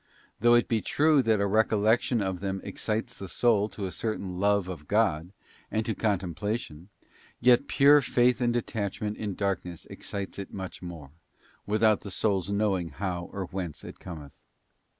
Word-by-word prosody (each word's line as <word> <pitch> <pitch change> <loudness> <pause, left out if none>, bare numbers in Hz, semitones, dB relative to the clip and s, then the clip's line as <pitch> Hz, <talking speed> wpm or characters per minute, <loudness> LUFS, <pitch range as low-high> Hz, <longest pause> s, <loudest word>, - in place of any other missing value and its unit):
Though 120 0 +5
it 120 - +3
be 115 -2 +1
true 150 +3 +3
that 110 -3 +2
the 100 - +1
recollection 110 +2 +2
of 95 -2 -2
them 95 0 -3
excites 115 +3 -3
the 95 - -7
soul 105 +2 +2
to 100 - -5
a 95 - -4
certain 95 -1 -4
love 100 -1 +2
of 80 -5 -7
God, 95 -6 +1 0.4
and 110 0 -1
to 110 - -1
Contemplation, 100 -3 -2 0.5
yet 125 +3 +4
pure 145 +1 +6
faith 125 0 +2
and 120 -1 +2
detachment 105 -3 -2
in 105 -3 -4
darkness 95 -4 -3
excites 100 -1 -6
it 100 - -7
much 95 -1 -7
more, 85 -6 -8 0.6
without 110 0 +3
the 100 - -7
soul's 95 -1 0
know 100 -1 +1
ing 85 - -4
how 85 +2 -4
or 100 -1 -4
whence 90 -4 -6
it - - -10
cometh. 75 -6 -9
100 Hz, 170 wpm, -28 LUFS, 95-110 Hz, 0.6 s, pure